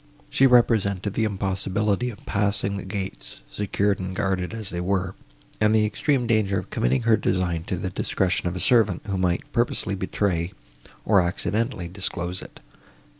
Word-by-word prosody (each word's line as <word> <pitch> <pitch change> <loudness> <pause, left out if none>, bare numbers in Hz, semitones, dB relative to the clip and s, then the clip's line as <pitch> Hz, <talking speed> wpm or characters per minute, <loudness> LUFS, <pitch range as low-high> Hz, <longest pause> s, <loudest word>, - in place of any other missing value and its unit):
She 135 - +5
represented 105 -6 +3
the 110 - +1
impossibility 100 +3 0
of 110 - -11
passing 100 0 0
the - - -5
gates, 95 - -5
secured 100 0 0
and 95 0 -4
guarded 95 -3 -1
as 110 -3 -6
they 85 - -3
were, 95 0 0 0.5
and 105 0 +4
the 110 -1 +4
extreme 125 +4 +1
danger 110 -4 +2
of - - -5
committing 60 - +1
her 115 -1 +5
design 90 -5 -1
to 95 - -2
the 95 +2 -3
discretion 90 -1 0
of 90 - -2
a - - -3
servant, 110 -7 +3
who 100 -2 -2
might 90 -1 +1
either - - -23
purposely 120 -4 0
betray, 95 -2 -1 0.5
or 100 -4 +5
accidentally 95 +3 -1
disclose 90 0 -2
it. - - -12
100 Hz, 170 wpm, -24 LUFS, 90-110 Hz, 0.5 s, She